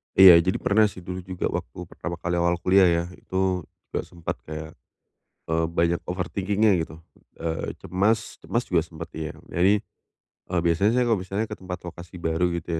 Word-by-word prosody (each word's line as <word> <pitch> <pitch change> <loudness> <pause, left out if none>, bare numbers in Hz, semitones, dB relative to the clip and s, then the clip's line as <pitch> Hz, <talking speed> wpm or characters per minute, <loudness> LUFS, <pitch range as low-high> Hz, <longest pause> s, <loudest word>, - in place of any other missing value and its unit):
Iya 95 -3 +10
jadi 90 +3 +1
pernah 105 +1 +4
sih 95 -3 -10
dulu 90 +1 -5
juga 95 -1 -2
waktu - - -5
pertama 85 0 -5
kali 90 0 -1
awal 85 0 +3
kuliah 95 +1 +5
ya 85 0 +2
itu 95 -2 -1 0.3
juga - - -1
sempet 85 -2 -5
kayak, 80 +1 -6 0.8
eee, 80 0 +2
banyak 85 +1 +1
overthinking-nya 100 +4 +1
gitu, 80 -1 -6 0.4
eee, 80 -1 -3
cemas 105 +5 0
cemas 120 +1 -1
juga 85 -3 +2
sempet 80 +1 -8
ya 80 -1 -4 0.2
jadi, 100 +4 +3 0.7
eee, 90 - +2
biasanya 85 +6 +3
saya 125 - +3
kalau 115 -4 +2
misalnya 100 +4 -2
ke - - -6
tempat 90 -1 -6
lokasi 85 +1 -9
baru 85 +2 +1
gitu 85 - -7
90 Hz, 175 wpm, -25 LUFS, 85-95 Hz, 0.8 s, Iya